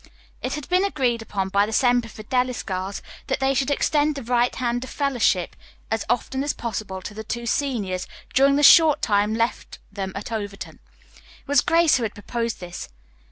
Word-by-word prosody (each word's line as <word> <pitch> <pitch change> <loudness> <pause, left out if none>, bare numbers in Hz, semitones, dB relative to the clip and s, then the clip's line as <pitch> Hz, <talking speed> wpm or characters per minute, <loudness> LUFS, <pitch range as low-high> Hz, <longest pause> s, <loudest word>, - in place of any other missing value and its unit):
It 260 +2 -2
had 300 -2 -7
been 365 +2 +2
agreed 255 - 0
upon 195 -3 -3
by 200 +1 +2
the - - -5
Semper 245 0 +2
Fidelis 250 +3 -2
girls 190 0 -4 0.2
that - - -1
they 270 0 +2
should 270 0 0
extend 295 +1 +1
the 275 - -6
right 245 +1 +1
hand 245 0 -1
of 260 - -8
fellowship 245 - 0 0.4
as 225 -1 -1
often 265 +2 0
as 290 - -1
possible 195 -4 -5
to 210 - -7
the 220 +1 -7
two 235 +2 -4
seniors 225 -8 -1 0.3
during 275 +1 +5
the 290 - +1
short 305 0 +7
time 205 0 +2
left 230 +1 -2
them 195 -1 -4
at 210 +4 -6
Overton. 205 -3 -5 0.3
It - - -23
was 285 -3 +4
Grace 335 -3 +4
who 245 - -3
had 215 - -3
proposed 230 +2 -3
this. 175 -1 -7
235 Hz, 190 wpm, -23 LUFS, 205-275 Hz, 0.4 s, short